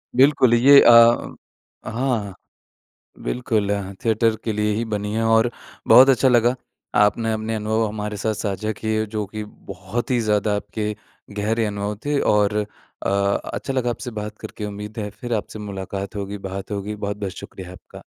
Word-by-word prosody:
बिल्कुल, 130 -2 +5
ये 135 +4 +8
अ 115 0 +6 0.6
हाँ। 115 -5 -1 0.9
बिल्कुल, 110 -5 -1 0.4
थिएटर 115 0 +2
के 110 - -1
लिए 105 0 0
ही 115 - -1
बनी 105 -1 -3
है। 115 +1 0
और 115 +1 +4 0.4
बहुत 130 +2 +8
अच्छा 130 0 +4
लगा, 120 0 +3 0.4
आपने 110 +2 +3
अपने 110 +1 -3
अनुभव 110 +1 0
हमारे 105 0 -4
साथ 110 +2 -1
साझा 105 +1 -3
किए 110 +1 -1
जो 105 0 -3
कि 105 +2 -6
बहुत 120 +3 -6
ही 120 - +2
ज़्यादा 105 -1 +1
आपके 105 +1 -3 0.5
गहरे 110 +2 +1
अनुभव 105 0 -3
थे। 145 -1 +1
और 105 0 +2 0.5
अ, - - +2 0.4
अच्छा 135 - -3
लगा 125 -2 0
आपसे 120 +1 -5
बात 105 0 -5
करके, 105 - -7
उम्मीद 105 +2 -7
है 105 -1 -3
फिर 120 +3 -6
आपसे 110 0 -4
मुलाक़ात 100 0 -6
होगी, 100 0 -4
बात 95 +1 -7
होगी। 105 +1 -3
बहुत-बहुत 100 -1 -4
शुक्रिया 90 -1 -9
आपका। 90 - -13
110 Hz, 160 wpm, -22 LUFS, 105-115 Hz, 0.9 s, ये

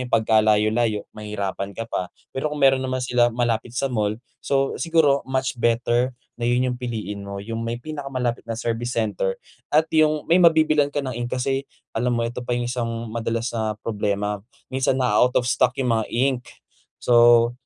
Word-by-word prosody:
yun 125 - -6
pagkalayo-layo 110 0 +2
mahirapan 100 -2 -4
ka 115 - -3
pa. 90 - -2 0.2
Pero 135 +3 -1
kung 150 - -4
meron 135 -1 +5
naman 130 0 -2
sila 120 -1 +3
malapit 120 -1 -1
sa 135 - 0
mall, 105 -3 0 0.2
so 135 -1 +1
siguro 160 -5 +3
much 130 0 -1
better 120 +2 +1 0.3
na 120 - 0
yun 125 +1 +2
yung 125 - -6
piliin 110 -5 -4
mo, 100 0 -6
yung 115 +1 -5
may 115 +1 -2
pinakamalapit 135 -4 -3
na 115 - -3
service 120 +1 -3
center 105 -4 0 0.3
at 155 +2 +4
yung 155 -1 +3
may 175 +2 +4
mabibilhan 155 -3 +4
ka 145 - -3
ng 130 - -3
ink 120 +1 -3
kasi 135 +2 -1 0.2
alam 120 +1 0
mo 115 - 0
ito 120 +1 -4
pa 120 0 -2
yung 120 - -1
isang 115 -2 -3
madalas 115 0 -2
na 110 -2 -2
problema 105 -2 -1 0.3
minsan 130 0 +1
na-a-out 125 0 +2
of 125 - +3
stock 125 +1 +2
yung 125 -3 +1
mga 110 -1 +1
ink. 130 +1 +1 0.6
So, 120 0 +6
120 Hz, 180 wpm, -23 LUFS, 110-130 Hz, 0.6 s, So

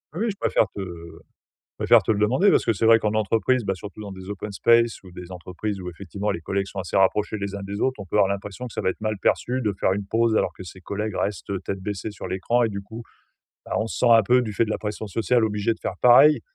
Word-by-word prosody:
Oui 210 +7 -1
oui, 230 - 0
je 200 - -11
préfère 110 - +2
te - - -6
je 85 -3 -10 0.4
préfère - - +6
te - - +1
le 105 - 0
demander 130 - +3
parce - - +3
que 115 - +2
c'est 110 +3 -1
vrai 115 0 +7
qu'en 105 0 -1
entreprise 115 +4 +1
bah 95 - 0
surtout 105 +3 -10
dans 100 -2 -7
des 95 0 -10
open 105 +1 -5
spaces 115 +3 +3
ou 90 - -13
des 90 0 -10
entreprises 90 +3 -5
où 90 - -5
effectivement 100 +4 -5
les 85 - -2
collègues 95 +3 -2
sont 100 - -11
assez 90 +1 -2
rapprochés 105 +3 +2
les 100 0 -4
uns 100 - -6
des 100 +1 -5
autres, 130 -4 0
on 100 - -7
peut 95 - -2
avoir 100 - +5
l'impression 100 +4 -5
que 115 - -12
ça - - -3
va - - +1
être - - -5
mal 110 -1 -2
perçu 130 +5 0
de 105 -3 0
faire - - +2
une 100 +1 -4
pause 115 +2 +1
alors - - +1
que - - -12
ses 95 +1 -11
collègues 105 +2 -4
restent 100 0 -3
tête 95 - -4
baissée 105 +2 -5
sur 100 - -8
l'écran 115 +6 0
et 115 - +1
du 100 -1 -5
coup, 110 +4 -9 0.7
bah - - -4
on 110 - -1
se - - -5
sent 125 - +3
un 115 -1 +7
peu 125 +5 +4
du 110 -3 -4
fait 105 - +2
de 110 - -6
la - - -1
pression 105 +1 -5
sociale 115 +4 +1
obligé 105 +1 0
de - - -20
faire - - -4
pareil, 135 +5 +7
105 Hz, 285 wpm, -24 LUFS, 95-115 Hz, 0.7 s, vrai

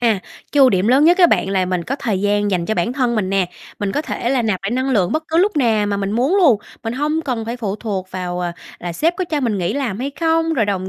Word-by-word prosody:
À, 225 -5 +2 0.3
cái 290 - +3
ưu 260 - +7
điểm 190 +3 +1
lớn 270 +4 +5
nhất 350 +3 +5
á 350 - +8
bạn 195 - +1
là 190 -2 +1
mình 180 -2 -2
có 275 - -3
thời 220 -9 -2
gian 205 0 +1
dành 175 -3 -1
cho 220 - 0
bản 175 +8 0
thân 250 -3 0
mình 195 -4 -1
nè, 195 -2 +1 0.3
mình 200 -1 -2
có 295 - -1
thể 240 -5 -3
là 260 -3 +1
nạp 210 -5 -1
lại 195 - -2
năng 260 +2 0
lượng 195 -8 +2
bất 310 - 0
cứ 320 - 0
lúc 385 +1 +2
nào 225 -6 +2
mà 205 -1 -1
mình 200 0 -2
muốn 260 - +2
luôn, 305 - +5 0.3
mình 225 - -2
hông 300 +4 -1
cần 245 -6 -3
phải 235 +2 -4
phụ 210 -4 -3
thuộc 195 -4 -4
vào, 180 -1 -4
ờ, 175 -1 -2 0.3
là 175 -1 -5
sếp 330 - 0
có 370 - -1
cho 310 -4 -2
mình 225 -6 0
nghỉ 175 +1 -1
làm 245 -6 -2
hay 275 +3 -3
không, 325 0 +2
rồi 230 - +2
đồng 190 -2 -2
225 Hz, 300 wpm, -19 LUFS, 195-280 Hz, 0.3 s, á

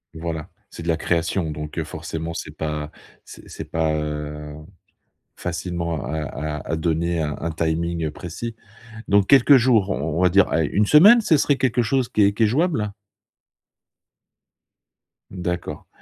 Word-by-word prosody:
Voilà, 80 -1 -5 0.2
c'est 85 - -9
de 85 - -8
la 80 - +2
création 85 0 -1
donc 75 +1 -7
heu, - - -1
forcément, 80 +1 -6
c'est 75 -1 -7
pas 75 -1 -4 0.3
c'est - - -13
c'est - - -7
pas, 80 -1 0
heu, 75 0 -5 0.8
facilement, 85 -3 -4
à 80 +5 -3
à 75 +1 -5
à 80 - 0
donner 85 +1 0
un 75 -2 -2
un 85 - -2
timing, 85 +1 -1
heu, 75 - -2
précis, 110 +9 -6 0.5
donc 100 -1 +3
quelques 140 0 +7
jours, 115 -6 +3
on 80 -1 -2
on - - +1
va 90 - +5
dire, 100 +2 +4
allez 80 -1 +1
1 105 0 +2
semaine, 205 +10 +8
ce 165 -8 +3
serait 140 0 +2
quelque 125 -2 +1
chose 130 +1 0
qui 105 - +2
est 100 - +4
qui 110 +2 +1
est - - +5
jouable? 125 - 0 2.4
D'accord 90 -2 -4
85 Hz, 165 wpm, -22 LUFS, 80-105 Hz, 2.4 s, semaine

